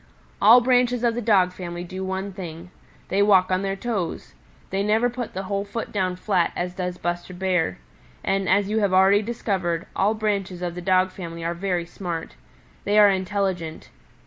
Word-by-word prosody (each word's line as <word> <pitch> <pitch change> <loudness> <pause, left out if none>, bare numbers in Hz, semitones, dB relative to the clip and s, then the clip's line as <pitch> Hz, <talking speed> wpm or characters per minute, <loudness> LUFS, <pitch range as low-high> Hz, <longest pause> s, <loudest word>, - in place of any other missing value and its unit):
"All 230 +4 +8
branches 245 -1 +2
of 235 -1 +3
the 240 - -3
Dog 195 -5 +3
family 175 -1 -6
do 185 +2 -6
one 190 +1 -3
thing: 175 -1 -8 0.4
they 195 - +2
walk 190 -3 +4
on 185 0 +2
their 195 0 -2
toes. 195 - -4 0.4
They 195 +1 0
never 220 +4 +2
put 240 -4 -6
the 190 - -3
whole 200 +1 -2
foot 205 +3 -5
down 185 -3 -1
flat 180 -2 +1
as 180 0 -3
does 180 -1 -4
Buster 175 +1 -4
Bear. 180 - 0 0.5
And, 195 -1 0
as 200 +1 +3
you 215 +2 0
have 200 -3 +1
already 195 +2 +5
discovered, 190 -6 -2
all 205 +3 +2
branches 200 -4 -2
of 175 -1 -2
the 180 - -6
Dog 185 0 +2
family 170 -3 -7
are 170 - 0
very 175 -1 -2
smart. 170 - -5 0.5
They 205 +1 +1
are 205 -1 +8
intelligent. 190 -4 -2
190 Hz, 185 wpm, -24 LUFS, 180-205 Hz, 0.5 s, All